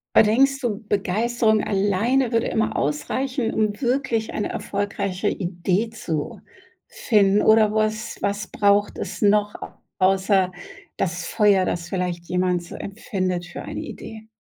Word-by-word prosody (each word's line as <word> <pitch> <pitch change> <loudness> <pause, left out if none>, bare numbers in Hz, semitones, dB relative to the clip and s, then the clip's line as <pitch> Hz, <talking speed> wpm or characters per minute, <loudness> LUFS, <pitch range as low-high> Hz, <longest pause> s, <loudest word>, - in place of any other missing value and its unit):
Aber - - +8
denkst 270 +6 +3
du, 225 -3 -2
Begeisterung 220 +3 +1
alleine 215 +6 +1
würde 230 +1 +1
immer 220 -1 0
ausreichen, 235 - -1
um 215 +3 -1
wirklich 240 -3 0
eine 210 - -2
erfolgreiche 200 -1 -3
Idee 185 +4 -1
zu 200 -1 -4 0.5
finden. 210 - +2
Oder 220 -1 +5
was 215 +1 -1
was 200 +1 -1
braucht 205 0 +2
es - - -4
noch, 205 0 +3
a - - -10 0.2
außer 190 0 +2 0.5
das 175 -1 -2
Feuer, 205 -4 +3
das 175 0 -3
vielleicht 180 -2 -3
jemand 180 0 0
so 170 - -10
empfindet 185 -4 -3
für 175 - -8
eine - - -6
Idee? 220 0 -9
205 Hz, 135 wpm, -23 LUFS, 185-225 Hz, 0.5 s, Aber